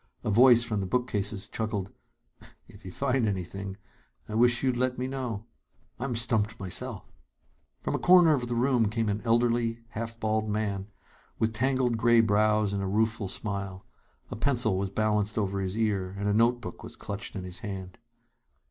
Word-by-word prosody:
A 110 Hz, -, -1 dB
voice 120 Hz, +2 st, +7 dB
from 110 Hz, -3 st, -1 dB
the 95 Hz, -, -2 dB
bookcases 105 Hz, -3 st, 0 dB
chuckled: 105 Hz, -4 st, -3 dB, 0.8 s
"If -, -, -16 dB
you 90 Hz, -, -7 dB
find 130 Hz, 0 st, 0 dB
anything, 95 Hz, 0 st, -4 dB, 0.5 s
I 105 Hz, -, -7 dB
wish 120 Hz, +3 st, +3 dB
you'd 130 Hz, -2 st, +2 dB
let 125 Hz, +1 st, 0 dB
me 125 Hz, -, -2 dB
know. 125 Hz, -6 st, -4 dB, 0.5 s
I'm 125 Hz, -1 st, -2 dB
stumped 115 Hz, -2 st, +1 dB
myself!" 100 Hz, +2 st, -6 dB, 0.8 s
From -, -, -2 dB
a -, -, 0 dB
corner 175 Hz, -3 st, +6 dB
of 125 Hz, -4 st, -1 dB
the 120 Hz, -, -2 dB
room 120 Hz, -3 st, +2 dB
came 110 Hz, 0 st, -1 dB
an 105 Hz, +1 st, -1 dB
elderly, 115 Hz, 0 st, +1 dB
half 115 Hz, 0 st, -6 dB
bald 110 Hz, 0 st, 0 dB
man 100 Hz, -2 st, -2 dB, 0.5 s
with 110 Hz, 0 st, 0 dB
tangled 125 Hz, 0 st, +1 dB
gray 120 Hz, +1 st, +4 dB
brows 105 Hz, -1 st, +3 dB
and 100 Hz, -, -1 dB
a 95 Hz, -, -2 dB
rueful 110 Hz, +1 st, 0 dB
smile. 100 Hz, -1 st, -5 dB, 0.5 s
A -, -, -3 dB
pencil 120 Hz, -3 st, +2 dB
was 95 Hz, +1 st, -1 dB
balanced 105 Hz, +1 st, 0 dB
over 100 Hz, -2 st, -1 dB
his 95 Hz, +2 st, -3 dB
ear, 100 Hz, -4 st, -1 dB
and 100 Hz, +1 st, -2 dB
a 100 Hz, -, +2 dB
note 120 Hz, +3 st, +3 dB
book -, -, -8 dB
was -, -, -10 dB
clutched 105 Hz, +3 st, -5 dB
in 95 Hz, -, -4 dB
his 90 Hz, 0 st, -7 dB
hand. 95 Hz, -5 st, -7 dB
110 Hz, 175 wpm, -28 LUFS, 100-120 Hz, 0.8 s, voice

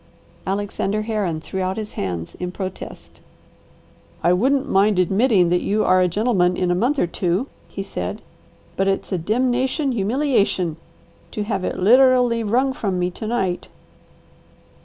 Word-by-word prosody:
Alexander 205 Hz, +1 st, -1 dB
Herron 205 Hz, -7 st, -2 dB
threw 190 Hz, +4 st, -5 dB
out 185 Hz, +2 st, -2 dB
his 215 Hz, -1 st, -5 dB
hands 85 Hz, -3 st, -4 dB
in 180 Hz, 0 st, -3 dB
protest. 185 Hz, 0 st, -8 dB, 1.0 s
"I 175 Hz, +2 st, +4 dB
wouldn't 265 Hz, +8 st, +2 dB
mind 200 Hz, +1 st, +3 dB
admitting 190 Hz, 0 st, +3 dB
that 180 Hz, 0 st, +2 dB
you 215 Hz, +2 st, 0 dB
are 185 Hz, 0 st, +4 dB
a 180 Hz, -, +4 dB
gentleman 180 Hz, -2 st, +1 dB
in 180 Hz, -1 st, +1 dB
a -, -, +3 dB
month 245 Hz, +11 st, +1 dB
or -, -, +2 dB
two," 180 Hz, +5 st, -1 dB, 0.2 s
he 195 Hz, -, -6 dB
said, 90 Hz, -, -5 dB, 0.5 s
"but 195 Hz, -, 0 dB
it's 195 Hz, +1 st, -1 dB
a 185 Hz, -, 0 dB
demnation 255 Hz, -, 0 dB
humiliation 205 Hz, -, 0 dB, 0.5 s
to 210 Hz, -, -3 dB
have 200 Hz, -3 st, -2 dB
it -, -, -2 dB
literally 245 Hz, +2 st, +4 dB
wrung 255 Hz, +5 st, +1 dB
from 195 Hz, -7 st, -2 dB
me 180 Hz, 0 st, 0 dB
to 215 Hz, -, -6 dB
night!" 190 Hz, -6 st, -1 dB
200 Hz, 155 wpm, -21 LUFS, 180-235 Hz, 1.0 s, I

